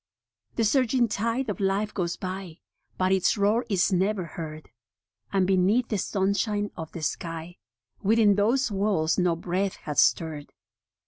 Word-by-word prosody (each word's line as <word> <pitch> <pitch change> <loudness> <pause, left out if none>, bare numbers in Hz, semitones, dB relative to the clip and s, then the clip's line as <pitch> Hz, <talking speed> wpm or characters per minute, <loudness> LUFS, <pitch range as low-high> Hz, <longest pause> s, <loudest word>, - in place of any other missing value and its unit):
The 230 - +1
surging 250 +1 +3
tide 230 +6 -1
of - - -3
life 200 +2 0
goes 175 -3 -2
by, 185 -3 -6 0.4
But 185 0 +1
its 190 +2 +2
roar 210 +4 +2
is 195 -1 +2
never 190 +1 +1
heard; 155 -3 -8 0.6
And 195 -2 +2
beneath 195 +6 +2
the 210 - -1
sunshine 200 +2 0
of 160 -2 -7
the 165 - -6
sky 165 +1 -4 0.4
Within 215 0 +4
those 230 +5 +1
walls 195 -6 +1
no 180 -2 +2
breath 185 +3 -2
hath 150 -1 -3
stirred. 155 -3 +1
195 Hz, 145 wpm, -26 LUFS, 175-215 Hz, 0.6 s, Within